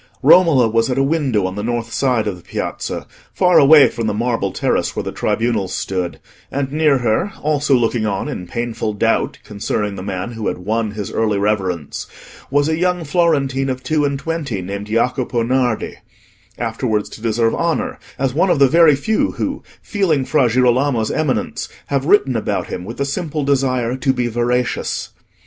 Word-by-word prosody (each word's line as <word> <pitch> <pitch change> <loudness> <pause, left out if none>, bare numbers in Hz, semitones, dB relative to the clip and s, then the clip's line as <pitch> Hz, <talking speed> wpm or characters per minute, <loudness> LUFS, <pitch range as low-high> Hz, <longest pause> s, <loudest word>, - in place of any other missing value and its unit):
Romola 160 -10 +6
was 115 +2 +1
at 125 - -1
a 135 - +3
window 135 - +1
on 95 - -2
the 105 - -4
north 115 0 -3
side 125 -5 +1
of 105 -3 -2
the 90 - -14
Piazza, 85 - -4 0.3
far 180 -1 +4
away 145 0 +8
from 115 -1 -3
the 105 - -1
marble 115 -4 -1
terrace - - -1
where - - -2
the - - -4
tribunals 110 -5 -1
stood; 90 -2 -3 0.3
and 135 -1 -2
near 150 -2 +3
her, 125 - 0
also 145 -2 +2
looking 120 -2 +1
on 100 -2 -2
in 90 - -5
painful 115 -1 -3
doubt 115 +2 0
concerning 105 0 -3
the 95 - -7
man 95 +3 -4
who 110 -2 -4
had - - -1
won 110 +4 -1
his 105 -1 -5
early 110 -2 0
reverence, 95 -7 -2 0.4
was 145 +1 +2
a 160 0 0
young 180 -1 +1
Florentine 140 -5 +1
of 130 0 -4
two 155 -1 +1
and 140 -1 0
twenty, 145 - -3
named 100 +3 -5
Jacopo 120 +2 0
Nardi, 125 -2 0 0.6
afterwards 115 -2 -1
to - - -11
deserve 115 0 +1
honour 245 +10 -1 0.2
as 135 -2 0
one 170 +6 +2
of - - +3
the 140 -1 +6
very 160 0 +5
few 215 +11 0
who, - - -3 0.2
feeling 170 - 0
Fra 130 -5 +2
Girolamo's 125 -1 +2
eminence, 155 -4 -1 0.2
have 140 0 0
written 135 -10 +4
about 110 - -2
him 90 - -5
with 115 +4 -7
the 140 - 0
simple 150 +1 -3
desire 130 -3 +1
to 130 +1 +1
be 125 -2 -1
veracious. 120 +1 -1
125 Hz, 180 wpm, -18 LUFS, 110-140 Hz, 0.6 s, away